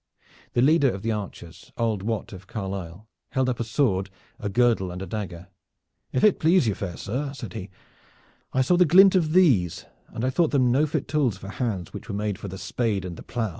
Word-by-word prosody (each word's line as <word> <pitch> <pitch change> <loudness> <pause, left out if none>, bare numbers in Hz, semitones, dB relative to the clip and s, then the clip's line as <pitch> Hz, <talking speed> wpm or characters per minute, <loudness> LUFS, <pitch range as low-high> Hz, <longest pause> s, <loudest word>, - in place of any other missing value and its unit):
The 120 - +3
leader 145 -1 +5
of 100 -3 -5
the 115 - 0
archers, 100 -5 -7
old 110 -4 0
Wat 110 0 -3
of 95 0 -11
Carlisle, 95 -1 -6 0.3
held 130 -1 +1
up 120 - -2
a - - 0
sword, 110 -6 0 0.3
a 105 - -3
girdle 115 -3 +2
and 90 +1 -6
a 95 - -5
dagger. 90 -3 -6 0.6
"If 130 - 0
it 210 - +5
please 165 -4 +4
you, 105 - +2
fair 95 -3 -5
sir," 135 +7 -3
said 115 -9 -7
he, 95 - -6 0.8
"I 130 - +2
saw 175 +7 +3
the 180 - +6
glint 190 +4 +7
of 165 -5 +2
these, 115 - +3 0.2
and 115 - -4
I 130 - +1
thought 165 +2 +2
them 130 -4 +3
no 145 +5 +3
fit 150 -1 -2
tools 130 -8 +1
for 95 0 -9
hands 100 -7 -3
which - - -9
were 100 - -3
made 105 -2 -2
for - - -6
the 95 0 -7
spade 105 -2 -1
and 90 -2 -6
the - - -10
plow. 115 -3 -3
115 Hz, 220 wpm, -25 LUFS, 95-135 Hz, 0.8 s, glint